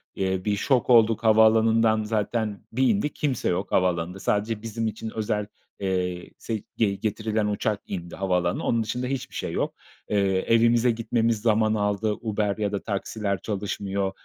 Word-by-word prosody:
Eee, 95 Hz, 0 st, -1 dB
bir 105 Hz, -1 st, +1 dB
şok 125 Hz, +5 st, +1 dB
olduk, 115 Hz, -2 st, +5 dB
havaalanından 110 Hz, 0 st, +4 dB
zaten 105 Hz, -2 st, -1 dB
bir 130 Hz, +3 st, +2 dB
indik; 200 Hz, -8 st, 0 dB
kimse 135 Hz, -5 st, -1 dB
yok 95 Hz, +2 st, -2 dB
havaalanında. 90 Hz, 0 st, 0 dB
Sadece 105 Hz, +2 st, -1 dB
bizim 115 Hz, 0 st, -3 dB
için 110 Hz, +1 st, -5 dB
özel, 105 Hz, -1 st, -1 dB, 0.3 s
eee, 90 Hz, -2 st, -2 dB
se 110 Hz, -3 st, -4 dB, 0.2 s
ge 100 Hz, -3 st, +2 dB
getirilen 110 Hz, +1 st, -1 dB
uçak 105 Hz, 0 st, -1 dB
indi 85 Hz, -3 st, -6 dB
havaalanına. 90 Hz, -2 st, 0 dB
Onun 115 Hz, -1 st, +1 dB
dışında 125 Hz, +3 st, -3 dB
hiçbir 135 Hz, -1 st, -4 dB
şey -, -, -3 dB
yok. -, -, -1 dB, 0.3 s
Eee, 105 Hz, -, +1 dB, 0.4 s
evimize 115 Hz, +1 st, +4 dB
gitmemiz 115 Hz, -1 st, 0 dB
zaman 110 Hz, -1 st, +3 dB
aldı. 105 Hz, 0 st, 0 dB
Uber 105 Hz, -2 st, -1 dB
ya 105 Hz, -1 st, -1 dB
da 100 Hz, -, -3 dB
taksiler 100 Hz, -2 st, -2 dB
çalışmıyor. 100 Hz, -1 st, -2 dB
110 Hz, 155 wpm, -25 LUFS, 100-115 Hz, 0.4 s, olduk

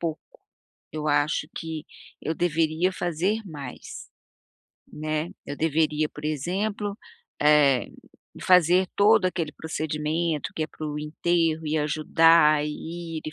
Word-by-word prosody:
pouco, 165 Hz, -2 st, -3 dB, 0.7 s
eu 155 Hz, -1 st, -3 dB
acho 145 Hz, +1 st, +1 dB
que 160 Hz, 0 st, -5 dB, 0.4 s
eu 160 Hz, -, -2 dB
deveria 165 Hz, +2 st, +1 dB
fazer 180 Hz, +5 st, -1 dB
mais, 145 Hz, -6 st, -9 dB, 0.8 s
né. 155 Hz, +2 st, -3 dB, 0.2 s
Eu 145 Hz, -, -5 dB
deveria, 155 Hz, -1 st, +1 dB
por 150 Hz, -, -11 dB
exemplo, 200 Hz, +7 st, -2 dB, 0.5 s
eh, 145 Hz, -4 st, +4 dB, 0.5 s
fazer 180 Hz, +1 st, +5 dB
todo 210 Hz, -1 st, +5 dB
aquele 170 Hz, -4 st, -2 dB
procedimento 155 Hz, 0 st, -2 dB
que 160 Hz, -, -2 dB
é -, -, -6 dB
para 155 Hz, 0 st, -7 dB
o 150 Hz, 0 st, -4 dB
enterro 160 Hz, +1 st, 0 dB
e 155 Hz, +1 st, 0 dB
ajudar, 155 Hz, 0 st, +4 dB
e 165 Hz, +2 st, -6 dB
ir -, -, -10 dB
e 155 Hz, -, -4 dB
155 Hz, 125 wpm, -25 LUFS, 150-170 Hz, 0.8 s, fazer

